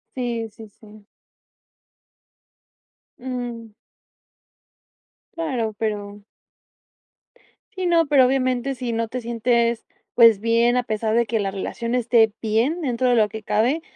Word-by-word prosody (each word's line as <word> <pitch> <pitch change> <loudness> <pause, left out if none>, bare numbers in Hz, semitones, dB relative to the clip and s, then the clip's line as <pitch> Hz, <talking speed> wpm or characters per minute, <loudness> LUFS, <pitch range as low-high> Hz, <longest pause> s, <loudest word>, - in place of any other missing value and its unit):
Sí, 235 -3 -3
sí, 220 +1 -13
sí. 210 0 -18 2.1
Mm. 240 -3 -6 1.7
Claro, 255 -10 -2
pero 205 -2 -4 1.5
Sí, 375 -1 -4
no, 335 -2 +3
pero, 275 -3 +5
obviamente, 255 0 0
si 245 -2 -4
no 230 0 -1
te 250 +2 -5
sientes, 235 0 0 0.3
pues, 230 -4 +6
bien, 230 +1 +2
a 250 - +1
pesar 220 -1 -2
de 235 - +3
que 225 0 -1
la 195 -1 -2
relación 235 +5 -4
esté 225 -3 +3
bien, 235 +10 0
dentro 255 -3 -1
de 245 - +3
lo 215 -2 +3
que 220 0 -8
cabe, 235 +11 +1
235 Hz, 125 wpm, -22 LUFS, 220-250 Hz, 2.1 s, pues